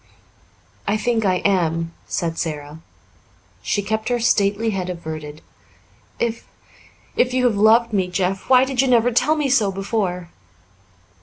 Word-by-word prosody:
"I 205 Hz, -, +1 dB
think 225 Hz, 0 st, 0 dB
I 185 Hz, -2 st, +1 dB
am," 165 Hz, -3 st, +1 dB
said 165 Hz, -1 st, -2 dB
Sara. 150 Hz, -1 st, -5 dB, 0.8 s
She 205 Hz, -, -1 dB
kept 220 Hz, +3 st, -2 dB
her 245 Hz, -1 st, 0 dB
stately 220 Hz, -1 st, +1 dB
head 185 Hz, -2 st, -3 dB
averted. 155 Hz, -3 st, -7 dB, 0.7 s
"If 230 Hz, -1 st, -3 dB, 0.7 s
if 250 Hz, 0 st, +1 dB
you 255 Hz, -1 st, +2 dB
have 235 Hz, -4 st, +2 dB
loved 225 Hz, +3 st, +4 dB
me, 190 Hz, -3 st, +1 dB
Jeff, 185 Hz, +3 st, -2 dB
why 255 Hz, 0 st, +6 dB
did 265 Hz, -1 st, 0 dB
you 270 Hz, -, +1 dB
never 245 Hz, -1 st, +3 dB
tell 300 Hz, +6 st, +2 dB
me 300 Hz, -2 st, 0 dB
so 225 Hz, -7 st, +2 dB
before?" 190 Hz, -3 st, -3 dB
205 Hz, 145 wpm, -21 LUFS, 180-235 Hz, 0.8 s, why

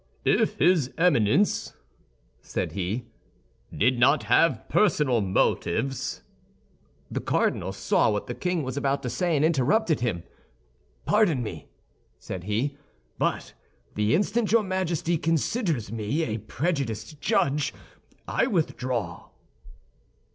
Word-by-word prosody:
"If -, -, +2 dB
his 155 Hz, -3 st, +3 dB
Eminence," 170 Hz, -, +2 dB, 0.7 s
said -, -, -3 dB
he, 100 Hz, +6 st, -3 dB, 0.7 s
"did 125 Hz, +3 st, +1 dB
not 120 Hz, -2 st, +4 dB
have 120 Hz, +2 st, +2 dB
personal 145 Hz, -, +2 dB
motives—" 100 Hz, +6 st, -1 dB, 0.9 s
The -, -, -2 dB
cardinal -, -, 0 dB
saw -, -, +2 dB
what 105 Hz, -1 st, -1 dB
the 120 Hz, -, -5 dB
king 180 Hz, +2 st, -1 dB
was 130 Hz, -1 st, -4 dB
about 140 Hz, 0 st, -1 dB
to 125 Hz, -, -3 dB
say 175 Hz, +5 st, 0 dB
and 150 Hz, +1 st, +3 dB
interrupted 160 Hz, -, +2 dB
him: 110 Hz, -9 st, -2 dB, 0.8 s
"Pardon 190 Hz, -, +3 dB
me," 85 Hz, -8 st, -7 dB, 0.5 s
said 90 Hz, -1 st, -7 dB
he; 130 Hz, +8 st, -1 dB, 0.4 s
"but -, -, -1 dB, 0.4 s
the 105 Hz, +5 st, +2 dB
instant 205 Hz, +4 st, 0 dB
your 230 Hz, -1 st, +4 dB
Majesty 175 Hz, -4 st, -1 dB
considers 165 Hz, -, -1 dB
me 115 Hz, +8 st, -1 dB
a 110 Hz, -5 st, -2 dB
prejudiced 140 Hz, -, -3 dB
judge, 140 Hz, 0 st, +1 dB, 0.6 s
I -, -, +1 dB
withdraw." 130 Hz, -, -2 dB
140 Hz, 115 wpm, -26 LUFS, 115-170 Hz, 0.9 s, not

